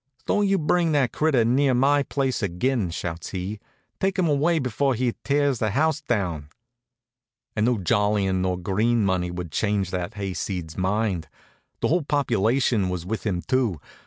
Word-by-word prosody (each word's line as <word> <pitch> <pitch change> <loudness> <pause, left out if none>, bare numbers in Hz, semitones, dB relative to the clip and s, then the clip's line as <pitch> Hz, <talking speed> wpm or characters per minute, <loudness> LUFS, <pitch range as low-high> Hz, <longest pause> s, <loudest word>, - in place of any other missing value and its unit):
"Don't 205 -1 +2
you 195 0 +3
bring 165 0 +1
that 135 -5 +2
critter 145 -7 +2
near 130 +2 +3
my 140 +3 +4
place 135 -3 -1
ag'in!" 100 +3 0
shouts 85 -1 -5
he. 95 +3 -4 0.4
"Take 195 +1 0
him 180 -3 +2
away 155 +3 +2
before 135 0 0
he 120 0 0
tears 140 -3 +1
the 110 - +1
house 155 +7 +1
down." 90 - -2 1.1
An' 105 0 +2
no 120 -1 +2
jollyin' 100 -2 +1
nor 90 -1 0
green 105 +5 +1
money 90 -2 0
would 90 -2 -6
change 100 0 0
that 90 +3 -3
hayseed's 95 -4 -4
mind. 95 -2 -1 0.5
The - - +1
whole 175 +3 +3
population 120 -6 +1
was 90 -2 -4
with 110 +3 -3
him 90 -4 -1
too. 120 - 0
110 Hz, 160 wpm, -24 LUFS, 95-140 Hz, 1.1 s, my